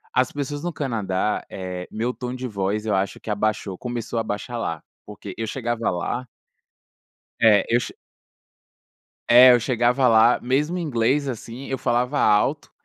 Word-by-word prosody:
As 130 0 +2
pessoas 145 0 -4
no 175 -1 -3
Canadá, 105 -8 -2
eh 90 -1 -6
meu 115 +3 -2
tom 125 0 -5
de 130 0 -5
voz 105 0 -2
eu 105 - 0
acho 95 0 -2
que - - -10
abaixou, 105 -2 -1
começou 120 0 -4
a - - -1
baixar 110 +3 -4
lá. 80 -8 -3 0.2
Porque 105 -2 -9
eu 115 -1 -3
chegava 120 -2 -2
lá 120 +8 -3 1.2
É, 105 -4 +5
eu 120 - +4
che - - -6 1.4
É, 125 +2 +9
eu 120 - +4
chegava 125 +1 +2
lá, 115 +2 +5
mesmo 145 +8 0
em - - -3
inglês, 140 0 +1
assim, 120 +1 -7
eu 135 - -2
falava 125 +3 0
alto, 105 -4 +2
120 Hz, 165 wpm, -23 LUFS, 105-130 Hz, 1.4 s, É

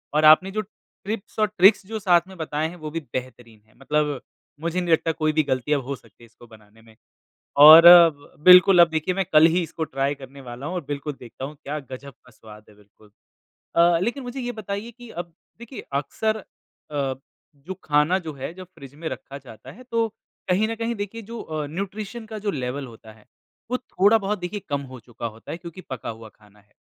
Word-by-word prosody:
और 155 0 +3
आपने 155 +5 +6
जो 215 +2 -2 0.4
टिप्स 215 0 -6
और 215 - +3
ट्रिक्स 195 +2 +5
जो 220 0 -4
साथ 175 -3 +4
में 190 - -12
बताए 155 -1 -2
हैं 175 - -11
वो 155 -2 -7
भी 165 - -3
बेहतरीन 120 -4 -7
हैं, 110 - -28
मतलब 150 -1 -1 0.4
मुझे 170 +2 -2
नहीं 175 - -2
लगता 160 0 +2
कोई 155 -1 0
भी 155 0 +2
गलतियाँ 140 +2 0
हो 140 +2 -5
सकती 120 - -21
है - - -13
इसको 115 +1 -19
बनाने 110 0 -19
में 110 -1 -20 0.7
और 160 +2 +11 0.6
बिल्कुल 180 0 +8
अब 170 - +7
देखिए 160 +3 -1
मैं 195 -1 0
कल 155 +1 +7
ही 180 - +2
इसको 160 0 -5
ट्राई 140 -1 -2
करने 135 +1 -11
वाला 125 +1 -9
हूँ 180 - -4
और 175 - -3
बिल्कुल 145 +1 -4
देखता 125 +2 -9
हूँ 150 +2 -9
क्या 150 +2 -4
गजब 140 +2 -9
का 125 - -18
स्वाद 105 -1 -15
है 105 - -19
बिल्कुल। 105 0 -23 0.7
अ, 170 0 +5
लेकिन 240 +7 -2
मुझे 250 +2 -6
ये 245 -1 -4
बताइए 200 +3 -5
कि 240 - -12
अब 170 -2 -7 0.3
देखिए 235 +2 -9 0.2
अक्सर 220 +10 -2
अ, 210 - -12 1.1
जो 170 +7 -8
खाना 150 +5 +2
जो - - -4
है, 135 +3 -6
जब 185 0 -10
फ्रिज 140 -2 -12
में 160 +2 -6
रखा 135 +1 -8
जाता 125 -5 -13
है 245 - -14
तो 230 -1 +1 0.4
कहीं 200 +5 +2
न 225 - -3
कहीं 230 +1 -2
देखिए 205 +3 -6
जो 235 - -6
अ, 155 -2 -5
न्यूट्रिशन 200 +7 -6
का 220 0 -7
जो - - +2
लेवल 135 -3 -4
होता 110 -2 -14
है, 110 -1 -22 0.5
वो 250 - +1
थोड़ा 220 -3 +2
बहुत 205 +1 -2
देखिए 180 +3 -5
कम 140 -1 -1
हो 125 - -10
चुका 115 0 -8
होता 110 0 -9
है 165 - -5
क्योंकि 170 +1 -10
पका 130 -3 -6
हुआ 115 0 -8
खाना 105 -1 -23
है। 105 +1 -33
155 Hz, 215 wpm, -23 LUFS, 130-195 Hz, 1.1 s, और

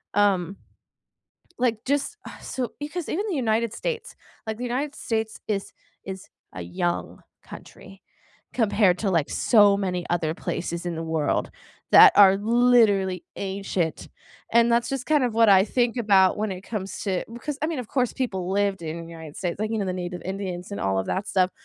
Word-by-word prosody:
um 195 -2 +2 1.0
Like, 235 -3 0
just 285 +9 -1
ugh, - - -12
so 250 -2 -4
because 300 +3 -5
even 400 +7 -2
the 385 - -1
United 230 -4 0
States 475 - -4 0.3
like, 220 0 -3
the - - -6
United 270 +4 -2
States 220 -1 -3
is 200 -2 -2 0.3
is 190 0 -8 0.2
a 90 - -6
young 175 - -3 0.2
country 195 0 -13 0.5
compared 205 -5 +2
to, 205 - -1
like, 165 -5 +1
so 205 -4 +4
many 180 -3 -2
other 165 -2 0
places 170 0 -4
in 175 -1 -3
the 165 - -4
world 160 -2 -1 0.4
that 430 -3 +9
are 195 -1 +8
literally 215 -4 +3
ancient. 190 -4 -3 0.4
And 235 0 +5
that's 235 0 +2
just 270 -2 -3
kind 300 -4 +3
of 245 - 0
what 225 0 +4
I 190 -1 +6
think 240 +2 0
about 195 -5 +4
when 210 -1 -2
it 185 - -7
comes 195 -2 -5
to 190 -3 -1
because 270 +5 -5
I - - +2
mean, 320 -3 -3
of 245 -4 -6
course, 250 -3 0
people 190 -9 -3
lived 200 -1 0
in 165 +1 -6
United 160 -3 -10
States, 175 -1 -3
like, 215 0 -1
you 225 - -1
know, 205 - -1
the 185 - -1
native 180 -1 -5
Indians 190 -1 -5
and 200 - -5
all 95 0 0
of 95 - -2
that 195 +2 -2
stuff. 185 -1 +2
200 Hz, 185 wpm, -24 LUFS, 180-235 Hz, 1.0 s, that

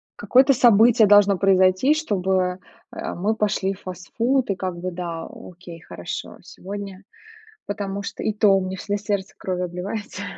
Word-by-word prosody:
какое-то 260 +7 +4
событие 230 -2 +5
должно 205 -1 +5
произойти, 190 +7 +3
чтобы, 190 - -1 0.4
э, - - -5
мы 205 +5 -1
пошли 205 -2 0
в 195 - -15
фастфуд 230 +8 -2
и 195 - 0
как 185 -2 -4
бы, 185 +1 -4
да, 170 -2 -5
окей, 175 -1 -12
хорошо, 85 - -7
сегодня. 195 0 -9 0.6
Потому 200 -1 -4
что - - -6
и 215 - 0
то 210 0 +3
у 195 -1 +3
меня 190 0 -5
всегда 205 +2 -3
сердце 200 -2 -3
кровью 180 -1 -3
обливается 195 +3 -6
195 Hz, 155 wpm, -22 LUFS, 185-210 Hz, 0.6 s, событие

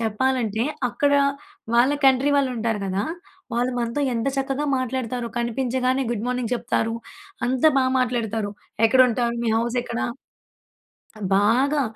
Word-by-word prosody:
చెప్పాలంటే, 225 0 0 0.3
అక్కడ 285 +4 +1 0.6
వాళ్ళ 250 +4 +5
కంట్రీ 270 +2 +4
వాళ్ళుంటారు 235 -5 0
గదా! 195 +1 -1 0.5
వాళ్ళు 245 +2 +1
మనతో 235 +4 -1
ఎంత 230 +3 0
చక్కగా 270 +2 -1
మాట్లాడుతారో 250 -2 -2
కనిపించగానే 255 +2 0
గుడ్ 230 -1 -2
మార్నింగ్ 250 -1 -2
చెప్తారు. 230 -1 -1 0.5
అంత 255 +2 -1
బా 260 - +3
మాట్లాడతారు. 225 -4 -1 0.4
ఎక్కడుంటారు, 245 -1 +3
మీ - - +1
హౌసెక్కడ. 235 0 -1 1.4
బాగా. 260 +8 +3
245 Hz, 110 wpm, -23 LUFS, 230-260 Hz, 1.4 s, వాళ్ళ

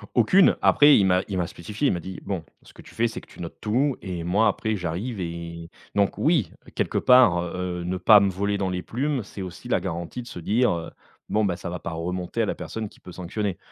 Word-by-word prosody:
Aucune, 180 - +5
après 145 0 +6
il 100 - +4
m'a 90 -1 +3
il 95 - -3
m'a 90 -2 0
spécifié, 105 - -3
il - - +2
m'a 90 - -2
dit: 95 +2 -7
«Bon, 95 -5 -3 0.2
ce - - -17
que - - -14
tu - - -16
fais, 115 +1 +2
c'est 115 - -7
que - - -19
tu - - -12
notes 85 - -7
tout 125 +6 +1
et 90 -3 -5
moi 100 +6 +3
après 110 +1 0
j'arrive» 95 +6 -4
et 85 -1 -6 0.3
donc, 100 -1 +2
oui, 150 - +2 0.2
quelque - - -1
part, 125 -9 +6
heu, 90 0 -4
ne 90 +1 -2
pas 105 +3 +7
me 100 -1 +2
voler 100 +2 -1
dans 95 -1 -1
les 90 -1 -2
plumes, 135 +1 -2
c'est 100 0 -9
aussi 90 -2 -8
la - - +2
garantie 85 +8 -5
de 120 - -12
se 90 - -8
dire, 115 +8 +2
heu: 85 -1 -4 0.4
«Bon, 110 - +2
bah, 90 -4 0
ça 85 - -6
va 90 +1 -5
pas - - -5
remonter 90 +2 -3
à - - +2
la - - -2
personne 110 -1 -5
qui - - -21
peut 90 - -12
sanctionner». 90 +2 -3
95 Hz, 250 wpm, -25 LUFS, 90-110 Hz, 0.4 s, pas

